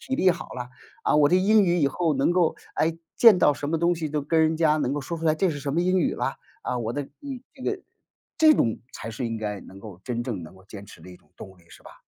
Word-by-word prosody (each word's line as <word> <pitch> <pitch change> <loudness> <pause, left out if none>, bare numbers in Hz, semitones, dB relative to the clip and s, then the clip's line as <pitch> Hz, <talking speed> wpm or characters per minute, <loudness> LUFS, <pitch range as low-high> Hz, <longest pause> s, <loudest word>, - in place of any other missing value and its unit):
体 265 - -3
力 190 - +3
好 170 - -9
啦， 125 -1 -6 0.4
啊， - - +2
我 150 -1 +5
的 180 - +4
英 205 +3 +4
语 175 -1 +2
以 145 - +3
后 160 +2 0
能 135 +5 +2
够 175 -2 +2 0.2
诶， 165 +1 0 0.2
见 225 -6 +7
到 145 - +4
什 145 +2 -5
么 165 - 0
东 170 +2 +2
西 160 -2 -4
都 150 0 -2
跟 160 +3 +1
人 160 0 +2
家 155 -2 +3
能 135 -3 -1
够 145 - -2
说 170 +5 -5
出 165 - -7
来 155 - +4
这 190 +3 +2
是 145 -3 -4
什 140 0 -3
么 170 - +1
英 185 +1 +2
语 - - +1
啦。 - - -2 0.2
啊， 125 - -2
我 115 -1 -3
的 145 - -2
嗯， 275 - -9 0.2
这 260 - -13
个 400 -2 -2 0.6
这 315 -1 +7
种 115 - +1
才 115 - -7
是 120 +3 -4
应 115 - -3
该 105 -2 -4
能 95 - -13
够 95 -3 -11
真 120 +1 -3
正 105 -8 -4
能 80 +4 -12
够 95 - -19
坚 100 -1 -10
持 - - -15
的 - - -13
一 90 - -12
种 - - -30
动 95 -1 -11
力， 85 - -24
是 - - -16
吧？ - - -15
150 Hz, 310 characters per minute, -25 LUFS, 120-175 Hz, 0.6 s, 见